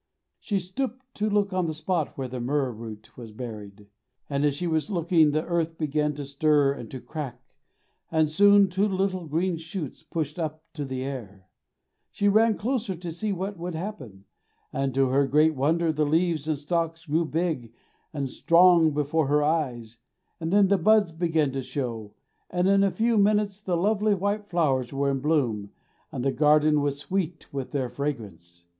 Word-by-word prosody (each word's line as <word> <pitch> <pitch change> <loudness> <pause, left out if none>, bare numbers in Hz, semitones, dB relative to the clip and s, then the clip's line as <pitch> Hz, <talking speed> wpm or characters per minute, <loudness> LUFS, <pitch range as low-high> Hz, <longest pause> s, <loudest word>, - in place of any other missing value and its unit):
She 200 - -1
stooped 250 +7 -5
to 215 +1 -1
look 205 -1 +1
on 185 -2 0
the 160 - -3
spot 160 0 -2
where 135 -1 -3
the 125 0 -6
myrrh 135 +1 0
root 110 -2 -10
was 115 -3 -10
buried, 105 -3 -8 0.5
and 140 0 0
as 145 -2 +2
she 175 - -3
was 160 +2 0
looking, 170 -4 +3
the 155 +2 -1
earth 165 -1 -1
began 150 -1 0
to 145 -1 -5
stir 140 0 +2
and 120 -5 -9
to 130 - -7
crack, 135 -4 -6 0.7
and 160 -1 +3
soon 200 +5 +5
two 190 +3 +1
little 190 -3 -1
green 170 +3 0
shoots 160 -2 -6
pushed 155 0 -4
up 155 -1 -4
to 150 -3 -4
the 130 -1 -4
air. 105 -9 -7 0.6
She 205 - 0
bent 220 +1 +4
closer 230 -4 -1
to 175 0 -6
see 205 +6 -3
what 195 0 -4
would 175 0 -4
happen, 135 - -7 0.5
and 135 0 -1
to 135 -1 +3
her 135 +1 +2
great 155 +4 +4
wonder 160 +4 +1
the 155 0 +1
leaves 160 0 +1
and 155 -2 0
stalks 165 +2 -2
grew 165 +2 +1
big 155 -8 -2 0.4
and 140 -3 -3
strong 170 +1 +4
before 150 +1 +1
her 150 +1 +3
eyes, 125 -8 -1 0.4
and 165 0 -3
then 200 0 +5
the 200 -1 +3
buds 210 0 +4
began 160 -3 0
to 135 0 -3
show, 115 -6 -5 0.3
and 180 +1 +1
in 195 0 +4
a 200 - +4
few 225 +2 +1
minutes 205 0 +2
the 180 -4 -1
lovely 210 +3 +2
white 200 +2 -2
flowers 140 -9 0
were 140 0 0
in 135 - -1
bloom 130 -9 0 0.4
and 125 - -4
the 135 - +3
garden 150 +2 +4
was 145 -1 -1
sweet 170 0 -4
with 135 -2 -4
their 135 -3 -1
fragrance. 100 - -6
155 Hz, 185 wpm, -26 LUFS, 135-180 Hz, 0.7 s, soon